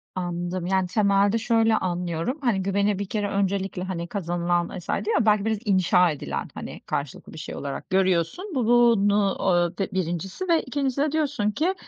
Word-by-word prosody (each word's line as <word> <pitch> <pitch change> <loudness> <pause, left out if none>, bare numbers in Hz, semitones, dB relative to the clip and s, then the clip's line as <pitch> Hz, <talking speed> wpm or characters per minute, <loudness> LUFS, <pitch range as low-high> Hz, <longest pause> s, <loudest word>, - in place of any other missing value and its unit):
Anladım. 175 0 -3
Yani, 190 -1 +1
temelde 200 +2 +2
şöyle 225 -1 +2
anlıyorum, 175 - -2
hani, 235 -8 +1
güveni 200 +1 +1
bir 200 - -2
kere 205 +1 -2
öncelikle, 195 -2 -1
hani, 175 -2 -4
kazanılan 175 -1 -1
vs. 175 - -15
diyor 445 - 0
ya, - - +1
belki 210 -1 +3
biraz 220 -1 +1
inşa 180 -3 +4
edilen, 70 - -4
hani, - - -8
karşılıklı 140 -2 -5
bir - - -10
şey 155 - -7
olarak 140 -1 -6
görüyorsun 190 - +1
bu 250 -3 +1
bunu 210 -4 +4
o 175 -1 +1
d 195 +1 -2
1'incisi 185 - -3
ve 330 -1 +4
2'ncisi 275 0 -1
de 295 0 +1
diyorsun 285 -9 0
ki, 325 - 0
195 Hz, 175 wpm, -25 LUFS, 175-225 Hz, -, inşa